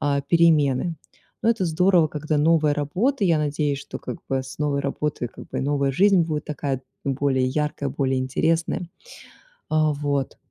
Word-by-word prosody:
а, 140 -1 +1
перемены. 160 -1 +3 0.5
Но 225 - +2
это 225 -5 0
здорово, 175 0 +3
когда 155 0 -2
новая 155 -1 +3
работа. 190 - 0
Я 165 -4 +3
надеюсь, 145 -1 -1
что, - - -8
как - - -6
бы, 135 -1 0
с 130 +2 -10
новой 145 -2 0
работой, 140 -3 -2
как - - -13
бы, - - -3
новая 140 -1 0
жизнь 195 +3 +4
будет 155 -2 -3
такая 140 -3 -3 0.2
более 135 -1 +1
яркая, 145 +1 -1
более 135 -1 0
интересная. 165 +6 0 0.8
А 155 -1 +2
вот, 140 -2 -2
150 Hz, 160 wpm, -23 LUFS, 140-165 Hz, 0.8 s, жизнь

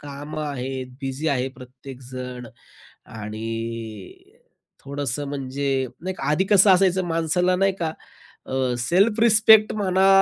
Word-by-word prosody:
कामं 145 +2 -7
आहेत; 130 -2 -4
बिझी 135 +4 -2
आहे 130 -2 0
प्रत्येकजण. 125 -1 -9 0.6
आणि 115 - -6 0.7
थोडंसं 140 0 -3
म्हणजे 135 -1 -2
नाही 185 +2 -4
का, - - -9
आधी 155 +5 +2
कसं 200 0 +6
असायचं 185 0 +4
माणसाला 170 +2 +1
नाही 195 +1 +2
का, 160 -1 -1 0.5
अ, 130 -1 -1
सेल्फ 195 - +2
रिस्पेक्ट 220 -1 +6
म्हणा 190 -2 +2
140 Hz, 115 wpm, -23 LUFS, 130-185 Hz, 0.7 s, कसं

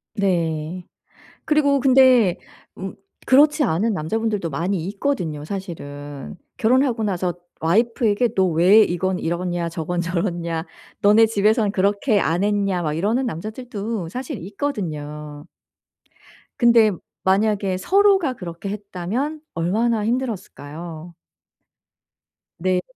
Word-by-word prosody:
네. 170 -3 -1 0.6
그리고 285 -2 +3
근데 255 -7 +5 0.4
음 190 0 -6 0.3
그렇지 295 +3 +5
않은 220 - +1
남자분들도 205 +2 -2
많이 170 +4 -2
있거든요, 190 - -2
사실은. 145 -6 -7 0.2
결혼하고 245 0 +2
나서 185 -3 -1 0.3
와이프에게 225 - +1
'너 190 - +3
왜 180 +6 +5
이건 185 0 -1
이렇냐. 175 0 -2
저건 170 +1 -3
저렇냐. 170 -2 -2 0.4
너네 210 +2 +6
집에서는 215 0 +2
그렇게 205 +3 +1
안 170 +1 0
했냐.' 200 -3 +1
막 155 -3 -1
이러는 215 +11 0
남자들도 215 -1 -5
사실 255 - -5
있거든요. 150 - -5 1.1
근데 235 -3 +5 0.3
만약에 195 0 +2
서로가 385 - +3
그렇게 175 -2 -7
했다면 210 - -4
얼마나 215 +6 0
힘들었을까요? 175 - -5 1.5
네. 185 +1 +1
195 Hz, 260 characters per minute, -22 LUFS, 170-230 Hz, 1.5 s, 너네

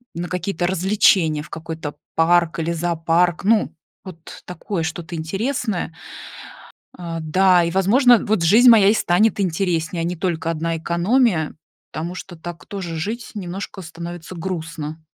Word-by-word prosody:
на 175 +1 -4
какие-то 180 -1 -2
развлечения, 185 -4 +2
в 150 - -14
какой-то 160 -2 -6 0.2
парк 170 0 +3
или 165 +1 -1
зоопарк, 170 +1 0
ну, 210 -5 +2 0.3
вот 170 -3 -11
такое 180 0 -4
что-то 165 +2 -5
интересное. 195 - -2 1.0
Э, 170 -2 -5
да, 180 +3 +4
и, 170 - 0
возможно, 230 +7 +5
вот 210 -3 +1
жизнь 225 +9 +6
моя 220 -4 +7
и - - +5
станет 215 +1 +2
интереснее, 170 -2 -1
а - - -1
не 175 +1 -2
только 165 -2 -2
одна 165 0 -2
экономия, 170 - +1 0.4
потому 170 +3 -5
что 185 -1 -9
так 170 +1 -9
тоже 185 -5 -6
жить 225 +9 -4
немножко 190 0 -6
становится 170 +1 -8
грустно. 160 -3 -5
175 Hz, 140 wpm, -21 LUFS, 165-195 Hz, 1.0 s, моя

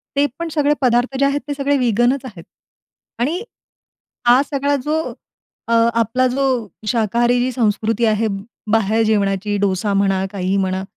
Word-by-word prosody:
ते 285 +1 +3
पण 335 -1 -3
सगळे 295 -1 +2
पदार्थ 250 +1 +1
जे 275 - +4
आहेत 280 +1 0
ते 290 - -2
सगळे 285 0 0
वीगनच 245 +2 +1
आहेत; 195 -10 -10 0.8
आणि 300 +9 0 0.9
हा 245 +2 +6
सगळा 285 0 +1
जो 305 +1 0 0.7
अ, 230 - 0 0.2
आपला 230 +3 +1
जो 270 +2 -1 0.4
शाकाहारी 235 +2 +1
जी 250 +1 0
संस्कृती 225 -1 0
आहे 220 0 +1 0.4
बाहेर 220 0 +2
जेवणाची 205 -1 0
डोसा 200 0 0
म्हणा, 195 -1 +1
काहीही 190 0 -1
म्हणा 190 -1 -1
235 Hz, 150 wpm, -19 LUFS, 205-270 Hz, 0.9 s, हा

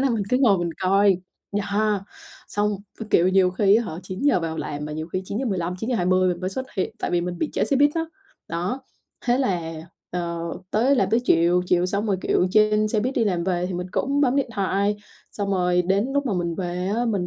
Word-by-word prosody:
là 270 -1 +2
mình 220 -3 0
cứ 250 - +4
ngồi 225 -8 +4
mình 175 -1 -1
coi, 195 0 +4 0.4
yeah. 205 0 0 0.5
Xong, 205 0 0 0.2
với 225 - -7
kiểu 175 +2 +4
nhiều 185 -1 +4
khi 200 +2 +4
á 235 - +1
hả 185 - -5
9:00 190 +11 0
giờ 185 - +2
vào 165 -1 -3
làm 145 0 -4
mà 150 - -5
nhiều 155 +1 -5
khi 185 - -1
9:15, 190 -6 -2
9:20 185 -6 +2
mình 175 -1 -2
mới 185 0 -2
xuất 260 +6 -4
hiện, 190 - -1
tại - - -2
vì 175 - +2
mình 175 0 -4
bị 310 - -1
trễ - - +1
xe 275 - +1
buýt 290 +2 +5
á, 330 -1 0 0.4
đó, 180 +11 -3 0.4
thế 245 +1 +3
là, 175 -10 -1 0.4
ờ, 170 -1 -3 0.3
tới 255 +6 +3
làm 195 -4 +1
tới 230 - +3
chiều, 175 0 +3
chiều 180 0 +2
xong 200 +3 -1
rồi, 195 -2 +1
kiểu, 180 - +2
trên 215 +1 +3
xe 215 0 +1
buýt 255 +5 -1
đi 230 - +2
làm 180 -4 0
về 180 -1 0
thì 185 - -4
mình 180 +1 -3
cũng 280 +2 0
bấm 270 -1 +3
điện 275 -3 +1
thoại, 200 +1 +1 0.4
xong 200 -1 -3
rồi 180 -2 +2
đến 195 +6 +1
lúc 285 0 0
mà 235 - 0
mình 170 -2 -1
về 180 0 -3
á 240 - +1
mình 200 -6 0
195 Hz, 235 wpm, -23 LUFS, 180-225 Hz, 0.5 s, buýt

